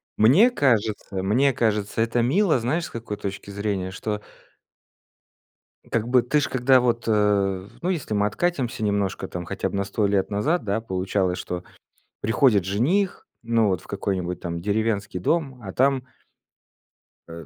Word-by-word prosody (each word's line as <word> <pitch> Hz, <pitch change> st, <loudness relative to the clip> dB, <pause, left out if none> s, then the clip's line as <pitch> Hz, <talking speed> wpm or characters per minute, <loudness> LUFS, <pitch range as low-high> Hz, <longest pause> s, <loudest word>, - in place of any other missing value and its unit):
Мне 160 Hz, -, +6 dB
кажется, 110 Hz, -, 0 dB
мне 130 Hz, +8 st, +3 dB
кажется, 105 Hz, -2 st, 0 dB
это 115 Hz, +1 st, +1 dB
мило, 155 Hz, -, +3 dB
знаешь, 145 Hz, +9 st, -1 dB
с -, -, -8 dB
какой 115 Hz, -3 st, -5 dB
точки 100 Hz, 0 st, -6 dB
зрения, 100 Hz, -2 st, -2 dB
что 105 Hz, +2 st, -4 dB, 1.7 s
как 115 Hz, -1 st, 0 dB
бы, 125 Hz, 0 st, +4 dB
ты 150 Hz, +5 st, +2 dB
ж, 145 Hz, -, 0 dB
когда 130 Hz, 0 st, +4 dB
вот, 120 Hz, -1 st, 0 dB
э, 100 Hz, -3 st, +1 dB
ну, 180 Hz, -, -1 dB
если 160 Hz, -12 st, -2 dB
мы 105 Hz, 0 st, +2 dB
откатимся 130 Hz, -1 st, -1 dB
немножко 100 Hz, -2 st, -1 dB
там, 90 Hz, -1 st, -6 dB
хотя 100 Hz, +2 st, -3 dB
бы -, -, -6 dB
на 100 Hz, -, 0 dB
100 100 Hz, +1 st, 0 dB
лет 100 Hz, 0 st, 0 dB
назад, 140 Hz, +10 st, 0 dB
да, 105 Hz, +1 st, -1 dB
получалось, 95 Hz, -2 st, -1 dB
что 90 Hz, 0 st, -5 dB, 0.6 s
приходит 115 Hz, -3 st, +3 dB
жених, 150 Hz, -, 0 dB, 0.2 s
ну, 115 Hz, -2 st, +2 dB
вот 90 Hz, -4 st, -1 dB
в -, -, -18 dB
какой-нибудь 95 Hz, -3 st, -3 dB
там 85 Hz, -1 st, -4 dB
деревенский 105 Hz, -2 st, -1 dB
дом, 135 Hz, -, -1 dB
а 95 Hz, -, -6 dB
там 135 Hz, +3 st, +2 dB, 1.2 s
э, 85 Hz, -1 st, -9 dB
105 Hz, 160 wpm, -24 LUFS, 100-125 Hz, 1.7 s, Мне